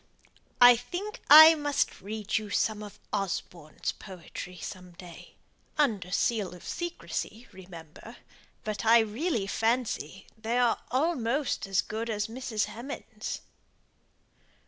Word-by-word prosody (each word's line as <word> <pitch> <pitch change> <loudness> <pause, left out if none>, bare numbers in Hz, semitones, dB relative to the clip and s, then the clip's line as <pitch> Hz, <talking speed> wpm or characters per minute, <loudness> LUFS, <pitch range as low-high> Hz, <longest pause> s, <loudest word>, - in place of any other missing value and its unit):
I 245 0 +9
think 355 - -6
I 315 +2 +11
must 290 -2 -1
read 215 +2 -2
you 215 -1 -8
some 215 +1 0
of 210 -1 -10
Osborne's 175 -5 -3
poetry 180 -1 -9
some 180 0 -8
day; 170 -1 -13 0.4
under 215 - +1
seal 205 -2 0
of 175 - -14
secrecy, 340 -8 -5
remember; 175 -4 -12 0.5
but 215 0 -4
I 230 +1 +7
really 225 - -1
fancy 220 - -1
they 225 +2 -2
are 245 -2 +2
almost 265 - 0
as 195 -1 +2
good 225 +2 -4
as 210 -1 -1
Mrs. 225 -1 -2
Hemans'." 245 +6 -7
220 Hz, 120 wpm, -28 LUFS, 195-250 Hz, 0.5 s, I